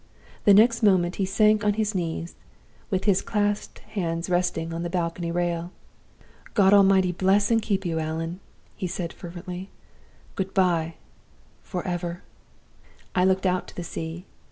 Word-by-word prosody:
The 205 - +8
next 230 +2 +5
moment 185 -4 +3
he 195 - +1
sank 210 +1 +3
on 210 0 +3
his 215 -1 0
knees, 170 -2 -3 0.6
with 190 -3 0
his 200 -2 +3
clasped 205 -1 -1 0.2
hands 170 -3 -2
resting 170 -2 0
on 165 - -3
the 175 - -3
balcony 170 -1 -2
rail. 175 0 -1 0.8
'God 195 -2 +5
Almighty 190 -2 +5
bless 195 +4 +2
and 225 -1 +4
keep 195 -3 -1
you, 165 -2 -1
Allan!' 165 +3 -3 0.4
he 190 - -3
said, 175 -1 -4
fervently. 180 +2 -8 0.6
'Good 190 0 -4
by, 170 -4 +2 0.7
forever!' 175 -1 -4 0.9
"I 180 0 +3
looked 190 0 +2
out 185 0 +1
to - - -13
the 175 - -4
sea. 165 +2 -6
180 Hz, 150 wpm, -25 LUFS, 170-195 Hz, 0.9 s, The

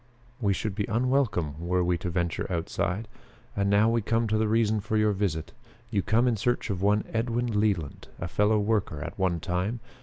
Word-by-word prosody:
We 105 -5 +1
should 100 +1 -1
be 100 0 -1
unwelcome 115 - 0
were 90 +2 +1
we 90 0 +2
to 85 - -3
venture 85 +1 -2
outside. 90 +4 -2 0.5
And 100 0 +1
now 100 +2 +4
we 115 0 +2
come 115 +2 +1
to 110 - +2
the 110 - +2
reason 110 -1 +2
for 110 +2 -1
your 105 0 +3
visit. 95 -6 -2 0.4
You 100 -3 +2
come 110 +5 +2
in 120 -3 +2
search 120 +1 0
of 95 -2 -3
one 105 +1 +3
Edwin 115 -1 0
Leland, 100 -9 -1
a - - -3
fellow 105 +5 +2
worker 105 -8 0
at - - -7
one 90 -3 +1
time. 95 +7 -2
105 Hz, 200 wpm, -27 LUFS, 90-110 Hz, 0.5 s, now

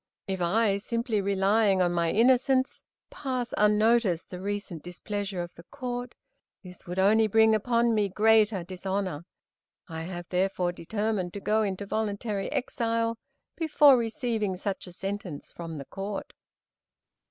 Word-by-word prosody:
If 190 -1 -2
I, 200 +3 +2
simply 230 0 -1
relying 200 +1 +2
on 180 -1 +3
my 170 -1 +1
innocence, 255 +4 +3 0.3
pass 255 -3 -3
unnoticed 210 -3 +3
the 180 -1 -6
recent 200 -4 -4
displeasure 190 +1 -4
of 175 - -9
the - - -13
Court, 245 -1 -5 0.5
this 180 0 -13
would 180 +1 -5
only 215 +3 +4
bring 220 +1 +5
upon 235 +2 +2
me 210 -2 +1
greater 215 -1 +3
dishonor. 185 -2 -3 0.6
I 160 -2 -6
have, 175 +1 -6
therefore, 180 -1 0
determined 200 +1 -2
to 200 - -5
go 215 +2 +1
into 200 -1 -2
voluntary 205 -1 -2
exile, 230 -4 -1 0.4
before 300 -4 +5
receiving 225 -4 -1
such 195 +1 -4
a - - -9
sentence 190 -4 -6
from 165 -2 -7
the 140 - -7
Court." 195 +4 -6
205 Hz, 140 wpm, -28 LUFS, 185-225 Hz, 0.6 s, bring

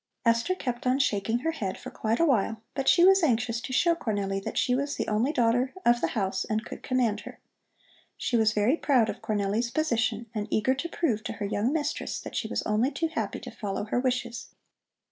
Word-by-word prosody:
Esther 230 +10 +2
kept 245 -7 -3
on 255 +1 +3
shaking 225 -4 +1
her 325 - 0
head 200 -12 -4
for - - -9
quite 225 +2 -1
a 335 - +5
while, 225 -5 +1
but 270 -1 +1
she 345 - +6
was 385 +1 +7
anxious 230 -5 +1
to 260 - -6
show 335 +6 +3
Cornelli 200 -9 -2
that - - -5
she 250 - +2
was 280 +3 -1
the - - -3
only 220 +6 +1
daughter 245 +1 +1
of 240 0 +4
the - - +2
house 190 -2 0
and 220 0 -2
could - - -8
command 240 -5 +1
her. - - -11 0.8
She 245 - -1
was 220 -2 +4
very 220 +8 +2
proud 255 -9 +3
of - - -5
Cornelli's 210 +2 0
position 235 -5 0
and 210 -2 -3
eager 220 +6 +2
to 340 +6 -4
prove 240 -12 -1
to - - -3
her 205 - -4
young 205 +4 0
mistress 300 -1 -2
that - - -8
she - - -1
was - - -2
only 215 +5 +1
too 330 +2 -2
happy - - -3
to - - -8
follow 200 -2 -4
her 215 +3 -1
wishes. 245 -2 -2
235 Hz, 220 wpm, -27 LUFS, 215-270 Hz, 0.8 s, was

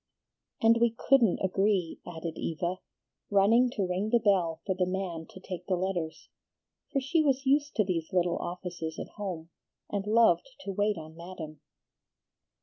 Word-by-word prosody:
"And 225 +1 +6
we 235 -1 +3
couldn't 245 -8 +4
agree," 190 -2 +1
added 165 -1 -5
Eva, 175 +3 -2 0.5
running 220 +5 +5
to 200 - +1
ring 185 +4 -1
the 240 - +5
bell 185 -7 +2
for 190 - +1
the 180 -1 0
man 180 -3 -3
to - - -12
take 180 -1 -7
the 190 - +2
letters, 175 -3 -3 0.6
for 275 - +1
she 275 +5 +2
was 275 -2 +1
used 290 +2 +2
to 215 - +4
these 170 -4 -2
little 175 -1 +1
offices 175 -2 -5
at - - -6
home, 175 -5 -5 0.4
and 200 0 -2
loved 225 +1 +3
to 200 - -4
wait 205 +1 +1
on 155 0 -9
Madam. 165 -3 -8
190 Hz, 160 wpm, -29 LUFS, 170-215 Hz, 0.6 s, And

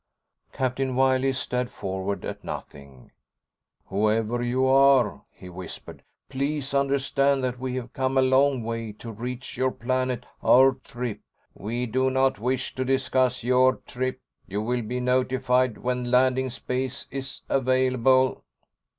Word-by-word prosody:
Captain 130 0 -1
Wiley 130 0 +3
stared 125 -1 -2
forward 95 +1 -4
at - - -6
nothing. 70 -3 -9 0.7
"Whoever 110 +4 0
you 125 +2 +1
are," 135 -5 +4
he 90 - -13
whispered, 90 +1 -9 0.3
"please 140 +1 -2
understand 140 0 +2
that 125 -1 -2
we 130 0 -3
have 125 -1 -5
come 130 0 0
a - - +6
long 130 -1 +3
way 115 -1 -4
to 115 +2 -9
reach 125 +3 -6
your 130 0 +2
planet. 130 -1 -2 0.2
Our 135 +1 +6
trip...." 120 -3 -5 0.3
"We 120 +4 -3
do 130 +3 +1
not 130 -4 +1
wish 130 +3 -2
to 130 - -2
discuss 130 -1 +1
your 130 +1 +4
trip. 130 +1 -3 0.3
You 105 +2 -3
will 120 +2 -1
be 120 +3 -3
notified 125 -1 +1
when 125 0 -2
landing 130 +1 +3
space 130 +1 -4
is 135 -1 -6
available." 130 0 +2
130 Hz, 135 wpm, -25 LUFS, 120-130 Hz, 0.7 s, a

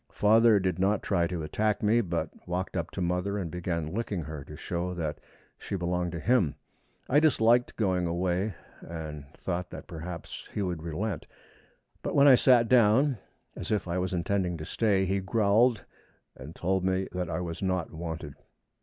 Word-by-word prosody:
Father 110 0 +5
did 95 -2 -1
not 100 +2 +2
try 85 -4 +1
to 85 -2 -4
attack 105 +8 0
me, 110 +3 +4
but 85 -5 -2 0.2
walked 90 +2 -3
up 85 -2 -2
to 95 - -5
mother 90 +3 0
and 90 -5 -3
began 85 -3 -3
licking 100 -5 -2
her, 75 -1 -7
to 75 - -10
show 90 +2 -3
that 80 -3 -3 0.4
she - - -4
belonged 90 -1 -1
to 85 - -3
him. 100 - +2 0.5
I 145 - +5
disliked 120 -6 +3
going 95 -5 +1
away, 90 +4 -1 0.3
and 75 -3 -7
thought 90 -1 -3
that - - -9
perhaps 85 0 -7
he 105 - -2
would 90 -4 -3
relent; 85 +3 -3 0.7
but - - -3
when 140 0 +7
I 135 - +9
sat 125 -2 +5
down, 125 +2 +4 0.4
as - - -6
if 105 -3 0
I 85 +1 -1
was 90 0 -1
intending 90 0 0
to 75 - -7
stay, 100 -2 +1
he 95 +1 0
growled 110 +4 +3 0.5
and 70 +5 -10
told 95 +1 0
me 95 0 0
that 90 -1 -3
I 80 - -2
was 85 -2 -5
not 95 -3 -1
wanted. 80 -3 -5
90 Hz, 180 wpm, -28 LUFS, 85-105 Hz, 0.7 s, I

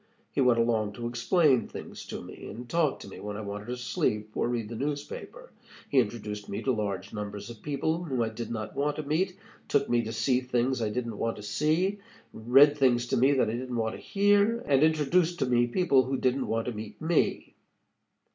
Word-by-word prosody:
He 140 - 0
went 125 -2 +4
along 110 -3 +1
to 120 - -6
explain 125 +3 +2
things - - -9
to - - -6
me, - - -10
and 120 +2 -8
talk 160 -1 +1
to - - -9
me 95 - -10
when 105 +1 -5
I - - -4
wanted 105 +1 -6
to 125 +1 -3
sleep 110 -3 -1
or - - 0
read 120 -3 -2
the 115 - -6
newspaper. 150 - -5 0.4
He 135 - +4
introduced 105 -3 -3
me - - -4
to 135 - +2
large 100 -4 -3
numbers 105 +1 -5
of 115 - -12
people 160 +4 -1
whom 130 -6 -2
I 110 - -1
did 115 +1 -6
not 110 -2 -5
want 145 +1 0
to 155 - -4
meet, 180 +6 0 0.3
took 140 -1 +2
me 120 -1 +4
to 110 - -4
see 120 +3 +1
things 125 0 0
I 110 - 0
didn't 115 -1 -4
want 115 0 -1
to 105 - -9
see, 155 - +1 0.3
read 135 +6 +5
things 120 -3 +3
to - - +1
me 135 +4 +4
that 130 -5 +2
I - - -4
didn't 125 +1 -4
want 110 -1 -1
to - - -9
hear, 205 +3 +3
and 140 -1 +3
introduced 160 +3 +3
to - - +1
me 120 -1 +3
people 140 -1 +3
who 135 +1 -1
didn't 130 +1 0
want 115 0 -1
to 125 - -2
meet 105 -1 -8
me. 160 0 0
125 Hz, 220 wpm, -28 LUFS, 110-145 Hz, 0.4 s, read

